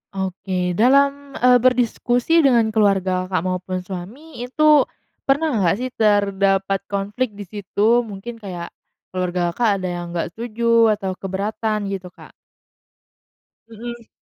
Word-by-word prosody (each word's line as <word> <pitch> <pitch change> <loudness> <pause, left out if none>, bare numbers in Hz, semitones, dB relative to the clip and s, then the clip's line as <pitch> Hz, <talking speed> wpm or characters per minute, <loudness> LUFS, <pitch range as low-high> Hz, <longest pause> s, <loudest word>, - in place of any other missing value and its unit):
Oke, 185 -1 -2
dalam, 280 +7 +2
eee, 250 0 +5
berdiskusi 245 +4 +2
dengan 240 -7 +4
keluarga 190 -4 +1
Kakak 185 -3 -1
mau 185 0 -1
pun 185 0 -5
suami 200 - -9
itu 290 +3 +4 0.4
pernah 295 +3 +2
enggak, 180 -3 +3
sih, 255 - -2
terdapat 195 -2 +2
konflik 205 +3 -2
di 205 - -7
situ, 210 +4 +1
mungkin 220 +3 -8
kayak 180 -5 -7 0.4
keluarga 180 -1 -1
Kakak 230 +6 +1
ada 185 - -1
yang 175 - -5
nggak 170 0 -2
setuju 230 0 +2
atau 195 -2 -4
keberatan, 200 +2 -3
gitu, 190 -2 -5
Kak? 180 - -15 1.4
Mhm. 235 +1 -8
210 Hz, 130 wpm, -21 LUFS, 190-240 Hz, 1.4 s, eee